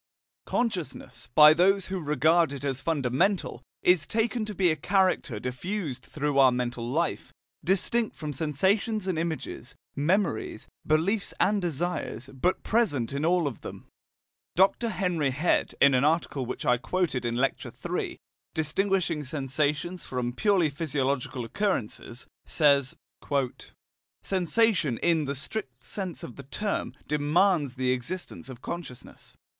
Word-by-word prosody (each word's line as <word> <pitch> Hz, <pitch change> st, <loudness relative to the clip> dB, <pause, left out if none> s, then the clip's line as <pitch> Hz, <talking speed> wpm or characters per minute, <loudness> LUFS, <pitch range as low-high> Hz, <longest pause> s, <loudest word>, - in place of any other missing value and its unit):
"Consciousness," 180 Hz, -, -3 dB
by 150 Hz, 0 st, +10 dB
those 190 Hz, +3 st, +3 dB
who 190 Hz, 0 st, -3 dB
regard 155 Hz, +2 st, +3 dB
it 140 Hz, -1 st, -6 dB
as 135 Hz, -2 st, -2 dB
fundamental, 160 Hz, -, 0 dB, 0.2 s
is 180 Hz, -4 st, +4 dB
taken 225 Hz, 0 st, 0 dB
to 210 Hz, -1 st, -6 dB
be 180 Hz, -2 st, +3 dB
a -, -, +1 dB
character 185 Hz, -, +1 dB
diffused 130 Hz, -, -4 dB
throughout 145 Hz, -1 st, -1 dB
our 130 Hz, -2 st, +7 dB
mental 120 Hz, -1 st, -2 dB
life, 165 Hz, +6 st, -1 dB, 0.3 s
distinct 205 Hz, +5 st, +1 dB
from 150 Hz, -1 st, -5 dB
sensations 190 Hz, -, 0 dB
and 185 Hz, -4 st, -1 dB
images, 160 Hz, -4 st, -4 dB, 0.2 s
memories, 155 Hz, -, 0 dB, 0.2 s
beliefs 180 Hz, +7 st, +1 dB
and 205 Hz, 0 st, +3 dB
desires, 165 Hz, -5 st, -3 dB
but 175 Hz, +8 st, 0 dB
present 145 Hz, -, +1 dB
in 140 Hz, +2 st, -2 dB
all 175 Hz, 0 st, +3 dB
of 135 Hz, -6 st, -4 dB
them.* -, -, -9 dB, 0.7 s
Dr. 195 Hz, +6 st, +3 dB
Henry 180 Hz, -8 st, 0 dB
Head, 150 Hz, +7 st, +1 dB
in 140 Hz, -, +6 dB
an 130 Hz, +1 st, +3 dB
article 150 Hz, -4 st, +1 dB
which 125 Hz, -, -5 dB
I 125 Hz, 0 st, +4 dB
quoted 150 Hz, 0 st, -1 dB
in 120 Hz, 0 st, -1 dB
Lecture 135 Hz, +3 st, -1 dB
III, -, -, -4 dB, 0.4 s
distinguishing 165 Hz, 0 st, 0 dB
sensations 150 Hz, +5 st, -1 dB
from 125 Hz, -1 st, -3 dB
purely 185 Hz, -, +2 dB
physiological 140 Hz, -4 st, -2 dB
occurrences, 120 Hz, -, -2 dB, 0.2 s
says: 140 Hz, -4 st, +3 dB, 1.3 s
"Sensation, 185 Hz, -, +2 dB
in 165 Hz, 0 st, +2 dB
the 140 Hz, +1 st, -2 dB
strict 130 Hz, -, -6 dB
sense 185 Hz, -, -5 dB
of 120 Hz, -, -8 dB
the -, -, -7 dB
term, 210 Hz, +6 st, -2 dB
demands 150 Hz, -1 st, +2 dB
the 130 Hz, -1 st, +1 dB
existence 135 Hz, +4 st, -4 dB
of 130 Hz, -2 st, -10 dB
consciousness." 160 Hz, -8 st, -8 dB
155 Hz, 135 wpm, -27 LUFS, 135-185 Hz, 1.3 s, by